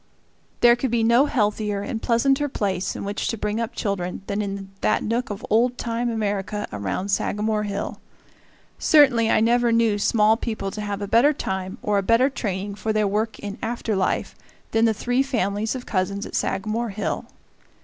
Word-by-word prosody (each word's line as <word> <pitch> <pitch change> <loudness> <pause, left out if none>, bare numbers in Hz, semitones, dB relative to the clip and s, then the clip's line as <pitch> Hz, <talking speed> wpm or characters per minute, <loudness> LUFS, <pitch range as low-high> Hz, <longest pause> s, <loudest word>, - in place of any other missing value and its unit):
There 240 0 +7
could 250 +2 -2
be 230 -1 +1
no 235 +5 +5
healthier 210 -4 0
and 230 -3 -4
pleasanter 270 +5 +2
place 195 -6 -2
in - - -5
which 200 +1 -3
to 230 - -2
bring 210 +1 -2
up 230 +1 -4
children 195 -3 -3
than 200 +1 -2
in 195 -1 -5
that 215 - +2
nook 235 +3 -1
of 205 -1 -6
old 240 +3 +3
time 235 +1 -2
America 210 -2 -2
around 105 - -3
Sagamore 210 +2 0
Hill. 200 0 -4 0.8
Certainly 260 -7 +5
I - - +4
never 240 +1 +3
knew 230 -3 +2
small 215 +1 +3
people 220 -5 -3
to 210 - -5
have 205 -1 -3
a - - -3
better 240 +8 +4
time 190 -7 -4
or 205 -1 +2
a - - 0
better 230 +7 +3
training 200 -4 -3
for 210 +2 -2
their 215 -1 +2
work 215 +2 -1
in 205 +2 -7
after 225 -2 -2
life 190 -1 0 0.4
than 225 +1 +3
the 225 - +3
three 245 +4 +1
families 220 -4 -1
of 250 - -6
cousins 200 0 -1
at - - -10
Sagamore 215 +4 -1
Hill. 205 +1 -3
215 Hz, 185 wpm, -23 LUFS, 200-235 Hz, 0.8 s, There